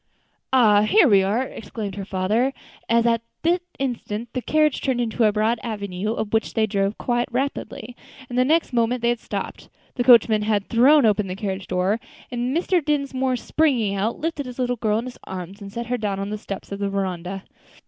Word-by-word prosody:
"Ah! 220 -6 +5
here 330 - +5
we 200 -5 +6
are," 205 +6 +1
exclaimed 210 -4 -6
her 195 0 -6
father, 210 +8 0 0.4
as 230 0 +3
at 230 -1 +2 0.2
that 345 +2 +2 0.2
instant 240 -4 -3
the 255 - -2
carriage 305 +1 +2
turned 260 -3 0
into 230 -1 +1
a 210 - +4
broad 220 +2 +1
avenue, 205 -2 -3
up 220 -1 -4
which 225 - 0
they 220 -1 +3
drove 200 -1 -1
quite 240 0 -1
rapidly, 245 -2 -3 0.3
and 245 - -7
the 250 - +4
next 310 +1 +1
moment 240 +1 +1
they 235 - +3
had 240 -1 0
stopped, - - -6 0.2
the 245 - -1
coachman 230 -3 +6
had 210 -2 0
thrown 265 +4 +5
open 210 -2 +2
the 185 - -4
carriage 195 -2 -4
door, 185 +4 0 0.3
and 245 +4 -1
Mr. 355 -1 +1
Dinsmore, 270 -3 0
springing 245 -6 +1
out, 205 +4 -1
lifted 305 -4 -3
his 250 - -8
little 245 -1 0
girl 215 -1 +1
in 230 - -3
his 255 - -9
arms 190 +2 -7
and 200 -1 -8
set 235 +2 -4
her 245 +1 -2
down 200 -2 -2
on 200 +1 -4
the 215 - -2
steps 195 -1 -7
of 200 - -4
the 200 -1 -1
veranda. 190 -1 -3
225 Hz, 205 wpm, -23 LUFS, 200-250 Hz, 0.4 s, we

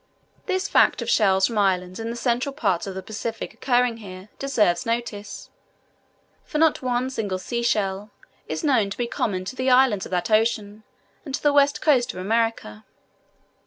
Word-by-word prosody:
This 375 0 0
fact - - +3
of - - -2
shells 190 -3 +4
from 230 -3 -1
islands 185 -1 0
in 225 0 -4
the 235 - -4
central 245 +3 -1
parts 200 - -1
of 190 - -6
the 190 - -6
Pacific 220 +1 -5
occurring 245 0 +1
here, 190 -2 -10
deserves 250 -8 +1
notice, 230 -4 -4 0.9
for - - -4
not 320 0 +3
one 250 0 -1
single 205 -7 -2
sea 235 +5 -3
shell 205 -3 -1 0.4
is - - -4
known 255 -9 +2
to 195 - -6
be 240 - -1
common 190 -5 -2
to 225 - -6
the 255 0 0
islands 250 -6 +4
of - - -16
that 180 +4 -2
ocean 215 -1 +1 0.4
and 275 -4 -4
to - - -8
the 290 -1 +4
west 285 0 +3
coast 265 -6 +3
of - - -6
America. 215 - -1
225 Hz, 180 wpm, -23 LUFS, 195-255 Hz, 0.9 s, shells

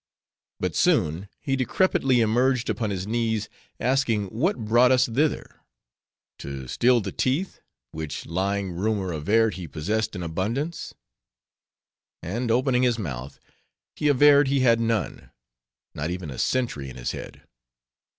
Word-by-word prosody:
But - - -2
soon 85 +6 +1
he 135 -2 -1
decrepitly 130 -1 +2
emerged 120 +2 +2
upon 110 +1 -2
his 95 -2 -3
knees, 110 -1 -1 0.3
asking 120 -6 +1
what 120 - -1
brought 120 +4 +5
us 130 0 +4
thither?—to 70 - -5
steal 120 - +3
the 95 -1 -5
teeth, 140 - -1 0.3
which 80 -1 -6
lying 95 +3 -1
rumor 95 +1 -1
averred 105 +9 +2
he 90 -3 -6
possessed 105 +10 -2
in 90 - -4
abundance? 115 - -3 1.3
And 115 +8 -3
opening 125 +2 +2
his 125 -2 +2
mouth, 70 - -6 0.6
he 150 - -1
averred 145 0 +6
he 135 0 +1
had 115 -2 +4
none; 115 -2 -2 0.6
not 75 +4 -3
even 90 -4 -5
a 65 - -7
sentry 115 - -1
in 65 - -10
his - - -3
head. - - -9
110 Hz, 130 wpm, -25 LUFS, 90-125 Hz, 1.3 s, averred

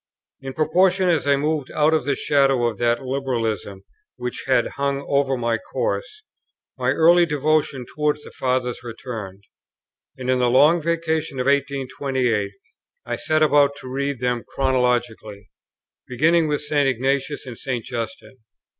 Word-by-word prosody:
In 135 -1 -6
proportion 180 +4 +3
as 160 -4 +1
I 140 - +5
moved 150 -1 -1
out 155 +1 +2
of 155 -5 +1
the 140 -1 +1
shadow 135 -4 +2
of 115 -3 -2
that 120 +1 +1
liberalism 115 -7 -3 0.3
which 125 -1 -5
had 130 - +2
hung 140 0 -2
over 140 -1 +1
my 115 -1 0
course, 460 -3 -4 0.5
my - - -1
early 170 +1 +5
devotion 150 -3 0
towards 150 +2 -1
the - - -11
Fathers 125 -1 -1
returned; 115 -5 -8 0.7
and 130 -1 -6
in 130 0 +2
the 125 -1 +3
Long 150 +7 +5
Vacation 160 -3 -1
of 125 - -1
1828 135 -5 0 0.5
I - - -2
set 155 0 +1
about 145 -1 +4
to 130 -2 -9
read 140 0 -2
them 125 -1 -1
chronologically, 120 -6 -1 0.6
beginning 160 +6 +2
with 145 -1 -1
St. 145 -2 +2
Ignatius 135 +3 -1
and 125 -2 -7
St. 125 -5 -3
Justin. 125 +3 -6
135 Hz, 145 wpm, -22 LUFS, 125-150 Hz, 0.7 s, I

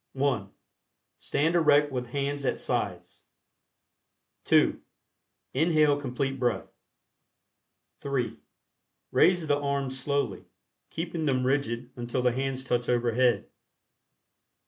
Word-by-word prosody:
(1) 130 -8 0 0.7
Stand 160 +4 0
erect 150 -3 +4
with 125 -2 -3
hands 140 +2 -2
at - - 0
sides. - - -3 1.2
(2) - - +3 0.7
Inhale 155 0 +3
Complete 135 0 -2
Breath. 120 -5 -1 1.3
(3) 135 -4 -2 0.7
Raise 180 -3 +4
the 145 -1 +1
arms 140 -2 -2
slowly, 140 +1 -2 0.4
keeping 165 -1 -3
them 130 -3 +1
rigid 125 -2 -1
until 120 +1 -3
the 125 - +4
hands 130 +1 -2
touch 120 -2 -1
over 120 -1 +2
head. 120 -3 +2
135 Hz, 100 wpm, -28 LUFS, 125-145 Hz, 1.3 s, erect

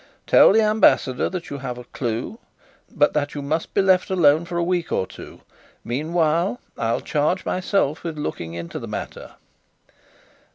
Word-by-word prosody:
"Tell - - +7
the 220 +2 +4
Ambassador 210 - +3
that 185 -2 -6
you 140 - -5
have 125 -2 -5
a 125 - -8
clue, 120 - -4 0.5
but 145 -1 +2
that 145 -1 -1
you 145 - -4
must 155 +3 -3
be 195 - +3
left 185 -1 +3
alone 165 -3 +4
for 170 0 -4
a 170 - +1
week 175 -1 -1
or - - 0
two. - - -12 0.4
Meanwhile, 165 - 0 0.2
I'll 115 0 -1
charge 155 +5 0
myself 185 -5 0
with 165 -3 -5
looking 85 - -5
into 85 0 -6
the - - -7
matter." - - -7
155 Hz, 165 wpm, -22 LUFS, 135-180 Hz, 0.5 s, Tell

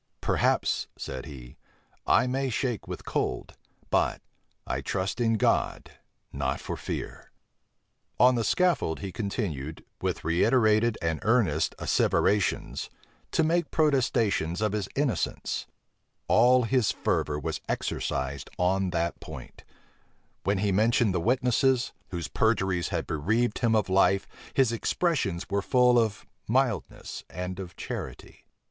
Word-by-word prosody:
"Perhaps," - - +1
said 65 +2 -6
he, 65 -5 -11 0.5
"I - - +5
may 130 +1 -1
shake 120 -2 -2
with - - -7
cold; - - -2 0.4
but, - - +2 0.5
I 65 - -2
trust 95 - -2
in 115 -1 +3
God, 110 - 0 0.4
not 70 0 -1
for - - -5
fear." - - -6 0.9
On 125 +1 +7
the 120 -2 0
scaffold, 165 - +1
he 100 -2 -4
continued, 85 - -4 0.2
with - - -2
reiterated 110 +5 +3
and 80 -2 0
earnest 100 -10 +2
asseverations, 105 -1 +1 0.4
to 165 - +2
make 170 +2 +1
protestations 120 - +1
of 105 -1 +1
his 105 -2 -2
innocence: 135 - -1 0.6
all 125 +3 +5
his 120 -1 +2
fervor 75 -1 -1
was - - -4
exercised 70 0 -2
on 95 +1 +1
that 85 -1 -1
point: - - -10 0.8
when 100 0 +1
he 100 +1 +1
mentioned 110 +1 +3
the 90 - 0
witnesses, 125 +2 +2 0.2
whose 85 -4 -4
perjuries 95 -6 +1
had - - -2
bereaved 110 +10 0
him 115 -2 +2
of 110 - +2
life, 95 +1 +3 0.3
his 130 -4 +4
expressions 115 - 0
were 100 +1 0
full 125 +2 +4
of 110 -3 -1 0.2
mildness 120 - -1
and 90 +2 -5
of 90 -3 -7
charity. - - -7
105 Hz, 130 wpm, -27 LUFS, 90-125 Hz, 0.9 s, On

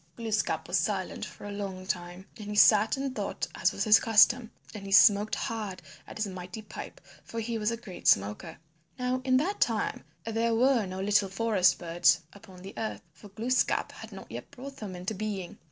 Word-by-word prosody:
Glooskap 220 -2 -1
was - - +1
silent - - -2
for - - -11
a 205 - -6
long 195 -2 -5
time 180 -1 -4
and 210 -3 -9
he 210 - -4
sat 215 +3 +5
and 270 -1 -3
thought - - -3
as - - +1
was - - -2
his 215 -1 +7
custom, 225 +2 +4 0.2
and 200 -2 -8
he - - -7
smoked 205 +1 +6
hard 210 -5 -4 0.3
at - - -9
his 215 - 0
mighty 185 +2 -7
pipe, 215 - -9 0.2
for 230 - -6
he 225 0 -3
was 210 0 +1
a 230 - -2
great 215 -6 -8
smoker. 100 +2 +2 0.4
Now 250 0 -1
in 255 0 +3
that 370 +9 -1
time - - 0 0.2
there 225 +1 0
were 245 -3 +3
no 185 +1 -5
little 205 0 +2
forest 190 -3 +2
birds 175 0 +2
upon 190 -3 -14
the 195 - -9
earth, 220 - -4
for 200 +6 -14
Glooskap 235 +6 0
had - - -11
not - - -11
yet - - -7
brought 275 0 -10
them 200 -4 -7
into 180 +4 -4
being. 205 -3 -5
210 Hz, 200 wpm, -29 LUFS, 190-230 Hz, 0.4 s, his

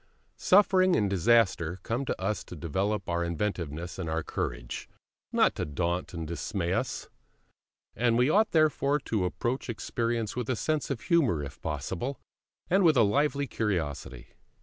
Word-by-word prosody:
Suffering 185 -2 +5
and 105 - +2
disaster 95 -3 +2
come 120 +4 -2
to - - -3
us 95 +1 -1
to - - -9
develop 95 +6 -2
our 85 0 0
inventiveness 85 -1 -3
and 85 -4 -3
our 80 0 -1
courage, - - -4 0.4
not - - +4
to - - -3
daunt 85 +4 -2
and 85 -1 -4
dismay 85 +2 -2
us; - - -2 0.9
and 120 -1 +2
we 125 +1 +4
ought 215 +8 +4
therefore 150 -3 +3
to 105 -7 -1
approach 120 +8 -2
experience 115 -1 -2
with 125 -1 -3
a 130 - +2
sense 155 +5 -1
of 135 -5 -3
humour, 135 - +2
if 70 - -9
possible, 85 - -3 0.5
and 190 +3 +3
with 160 -5 +5
a 115 - +6
lively 140 +6 +2
curiosity. 75 - -3
105 Hz, 155 wpm, -29 LUFS, 85-135 Hz, 0.9 s, a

